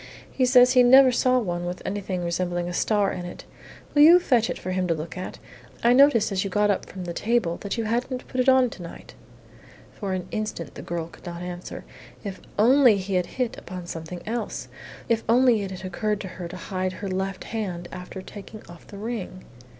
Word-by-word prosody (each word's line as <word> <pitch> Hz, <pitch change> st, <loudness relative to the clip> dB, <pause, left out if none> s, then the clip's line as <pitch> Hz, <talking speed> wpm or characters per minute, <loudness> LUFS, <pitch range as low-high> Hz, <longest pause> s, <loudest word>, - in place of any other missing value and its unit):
"He 255 Hz, -2 st, +1 dB
says 250 Hz, 0 st, +7 dB
he 250 Hz, -, +7 dB
never 260 Hz, +1 st, +7 dB
saw 255 Hz, +1 st, +3 dB
one 175 Hz, -7 st, -2 dB
with 180 Hz, +1 st, -4 dB
anything 190 Hz, -2 st, -3 dB
resembling 175 Hz, 0 st, -1 dB
a 175 Hz, -, -4 dB
star 205 Hz, +1 st, +1 dB
in 180 Hz, -, -5 dB
it. 175 Hz, -, -9 dB, 0.5 s
Will 290 Hz, -, +5 dB
you 335 Hz, +4 st, +9 dB
fetch 245 Hz, -10 st, +2 dB
it -, -, -3 dB
for 185 Hz, -, -5 dB
him 185 Hz, 0 st, 0 dB
to 165 Hz, -, +1 dB
look 155 Hz, +1 st, -6 dB
at? 185 Hz, 0 st, -6 dB, 0.5 s
I 235 Hz, +1 st, +5 dB
noticed 260 Hz, -5 st, +5 dB
as 190 Hz, -1 st, 0 dB
you 195 Hz, -, -3 dB
got 205 Hz, +2 st, +2 dB
up 200 Hz, -, -2 dB
from 185 Hz, -, -8 dB
the 170 Hz, -, -4 dB
table 215 Hz, -5 st, 0 dB
that 200 Hz, +3 st, -4 dB
you 230 Hz, -, 0 dB
hadn't 245 Hz, +3 st, -2 dB
put 255 Hz, -, -1 dB
it 255 Hz, -, +3 dB
on 260 Hz, -2 st, +4 dB
to -, -, -10 dB
night." 170 Hz, -, -10 dB, 0.8 s
For 195 Hz, -3 st, -4 dB
an 185 Hz, -1 st, -3 dB
instant 215 Hz, -8 st, -4 dB
the -, -, -8 dB
girl 170 Hz, -1 st, -4 dB
could 170 Hz, -, -14 dB
not 170 Hz, 0 st, -6 dB
answer. 180 Hz, 0 st, -7 dB, 0.4 s
If 200 Hz, -3 st, -6 dB, 0.2 s
only 245 Hz, 0 st, +6 dB
he 195 Hz, 0 st, -4 dB
had 180 Hz, -1 st, +1 dB
hit 250 Hz, -3 st, -1 dB
upon 180 Hz, -1 st, -8 dB
something 170 Hz, +1 st, -7 dB
else. 235 Hz, +2 st, -4 dB, 0.4 s
If 225 Hz, -1 st, +1 dB
only 240 Hz, -2 st, +5 dB
it 195 Hz, -, -4 dB
had 190 Hz, 0 st, -7 dB
occurred 210 Hz, +3 st, -1 dB
to 190 Hz, -, -6 dB
her 180 Hz, -1 st, -7 dB
to 180 Hz, +2 st, -8 dB
hide 185 Hz, 0 st, -3 dB
her 200 Hz, -, -6 dB
left 190 Hz, 0 st, -3 dB
hand 185 Hz, -6 st, -4 dB
after 185 Hz, +1 st, -8 dB
taking 210 Hz, +2 st, -10 dB
off 175 Hz, 0 st, -14 dB
the 200 Hz, -, -10 dB
ring! 210 Hz, -4 st, -5 dB
195 Hz, 220 wpm, -25 LUFS, 180-235 Hz, 0.8 s, you